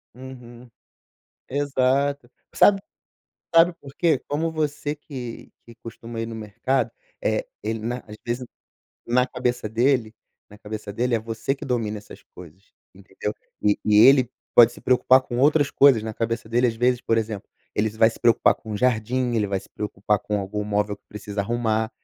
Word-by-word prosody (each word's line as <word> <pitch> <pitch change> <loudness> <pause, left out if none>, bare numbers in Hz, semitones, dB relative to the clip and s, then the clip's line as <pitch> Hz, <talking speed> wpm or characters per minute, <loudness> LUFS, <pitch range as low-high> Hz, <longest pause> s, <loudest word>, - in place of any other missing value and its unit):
Uhum, 125 -2 -12 0.8
exato. 140 -1 0 0.2
Sabe 195 -1 +5 0.7
sabe 165 +1 +6
por 140 -1 -12
quê? 160 -6 +2
Como 160 +3 -1
você 150 -1 -2
que 130 -6 -8
que 115 - -15
costuma 115 0 -8
ir 115 - -2
no 115 - -7
mercado, 110 +5 -1 0.3
eh, - - 0 0.2
ele 110 - -2
na 120 +3 -3
às 105 - -9
vezes, 120 +2 -2 0.6
na 125 +2 +2
cabeça 125 -3 -2
dele 115 0 +1 0.3
na 105 0 -15
cabeça 105 -1 -7
dele, 120 +3 0
é 115 - +2
você 115 +4 -3
que 145 - -9
domina 115 -5 -2
essas 105 - -14
coisas, 90 +2 -14 0.2
entendeu? 100 +2 -6 0.3
E 105 -1 +2
e 105 -1 +3
ele 130 -3 +5 0.2
pode 120 0 +8
se - - -13
preocupar 130 +1 +4
com 120 -1 -5
outras 145 +1 +4
coisas. 135 -5 +5
Na 110 0 -4
cabeça 115 0 -3
dele, 120 +2 +2
às 115 - -2
vezes, 125 +1 +2
por 115 - 0
exemplo, 110 -2 -4 0.3
ele 105 +1 +1
vai 110 +1 +4
se - - -12
preocupar 120 -1 +4
com 110 -2 -7
jardim, 125 +1 0
ele 105 -2 +1
vai 100 -1 -1
se - - -17
preocupar 105 0 -2
com 105 -1 -2
algum 100 +2 -4
móvel 105 0 -1
que - - -45
precisa 105 -1 -5
arrumar. 110 0 0
120 Hz, 175 wpm, -23 LUFS, 105-130 Hz, 0.8 s, pode